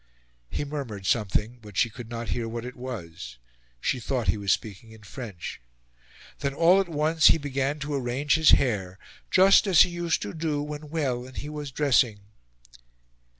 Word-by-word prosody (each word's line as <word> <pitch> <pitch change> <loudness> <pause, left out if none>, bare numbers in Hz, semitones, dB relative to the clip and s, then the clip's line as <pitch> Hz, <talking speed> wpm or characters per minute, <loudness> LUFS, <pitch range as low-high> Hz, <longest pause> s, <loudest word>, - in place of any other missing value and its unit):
He 145 - -3
murmured 130 -10 -6
something, 110 +3 0
but 105 -2 -11
she 120 -4 +2
could 115 0 -10
not 115 -2 -5
hear 115 0 -2
what 115 +1 -5
it 125 - -7
was; 85 - -7 0.4
she 125 - -1
thought 120 -3 -1
he - - +3
was 100 -2 0
speaking 110 +3 -3
in 110 -1 -16
French. 100 - -8 0.8
Then 140 -2 -2
all 175 +5 +5
at 190 - -5
once 160 +1 +3
he - - +6
began 140 -1 -2
to 145 +1 -3
arrange 135 +2 0
his 160 -1 +4
hair, 95 -8 +2 0.3
"just 195 +2 +6
as 180 -4 +7
he 180 - -2
used 175 -1 -1
to 100 - -6
do 155 -2 -2
when 150 0 -7
well 130 -6 -2
and 130 - -13
he 150 - -5
was 150 -1 -6
dressing." 125 -7 +2
130 Hz, 180 wpm, -26 LUFS, 110-150 Hz, 0.8 s, as